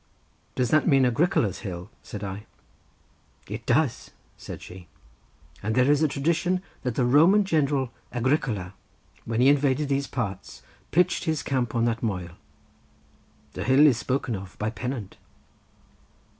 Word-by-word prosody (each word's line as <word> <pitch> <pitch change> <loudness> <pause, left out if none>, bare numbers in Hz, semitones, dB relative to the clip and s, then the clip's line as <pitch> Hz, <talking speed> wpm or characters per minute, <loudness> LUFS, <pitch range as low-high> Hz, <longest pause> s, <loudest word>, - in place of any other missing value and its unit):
"Does 125 -2 0
that 155 -1 +3
mean 135 -5 +5
Agricola's 120 - +1
hill?" 90 -4 -7
said 105 -1 -8
I. 100 +2 -6 1.0
"It - - -7
does," - - +1 0.3
said - - -9
she; 90 -1 -11 0.7
"and 110 +2 -2
there 130 +2 +4
is 145 0 +3
a 155 - +4
tradition 170 +6 0 0.2
that 125 -3 -3
the 125 - +2
Roman 165 +11 +5
general 140 -7 +1 0.2
Agricola, 120 - -1 0.5
when 115 +1 -1
he 130 - +5
invaded 140 0 +3
these 140 0 0
parts, 100 -6 -5 0.3
pitched 180 +1 +2
his 155 -3 -1
camp 125 -4 -1
on 115 0 +2
that 115 -1 -1
moel. 90 -6 -2 1.2
The - - -4
hill 135 +4 +5
is 135 -6 +5
spoken 130 -2 -1
of 95 -1 -9
by 105 +1 -2
Pennant." 120 -3 -5
130 Hz, 145 wpm, -26 LUFS, 110-145 Hz, 1.2 s, mean